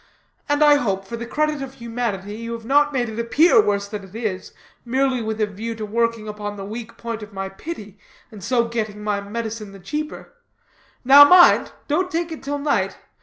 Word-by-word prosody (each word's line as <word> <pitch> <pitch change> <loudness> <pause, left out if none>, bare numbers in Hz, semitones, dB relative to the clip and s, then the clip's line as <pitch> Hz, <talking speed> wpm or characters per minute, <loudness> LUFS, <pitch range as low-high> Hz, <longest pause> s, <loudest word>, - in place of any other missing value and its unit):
And 290 +1 +3
I 295 -1 +7
hope, 195 -7 -2
for 235 - -6
the 235 0 -6
credit 305 +1 -1
of 270 0 -7
humanity, 230 -5 -4
you 230 +1 -5
have 230 -1 -7
not 290 +3 +3
made 250 -3 -1
it 220 +1 -6
appear 320 - +5
worse 200 - -1
than 205 -1 -6
it 195 +1 -14
is, 210 -5 -4 0.3
merely 260 +1 0
with 220 0 -3
a 215 - +3
view 215 +3 -6
to 220 -1 -5
working 230 0 -1
upon 210 -1 -5
the 195 - -6
weak 225 +2 -8
point 230 -1 -5
of 210 0 -10
my 195 0 -4
pity, 205 - -9 0.3
and 210 -4 -11
so 235 +1 +1
getting 215 -3 -4
my 205 -1 -1
medicine 215 0 -5
the 195 - -12
cheaper. 300 +11 -6 0.7
Now, 280 +3 +10
mind, 360 +4 +6 0.2
don't 360 +5 0
take 335 0 -2
it 320 - -7
till 285 +1 -3
night. 285 0 0
230 Hz, 205 wpm, -22 LUFS, 210-275 Hz, 0.7 s, Now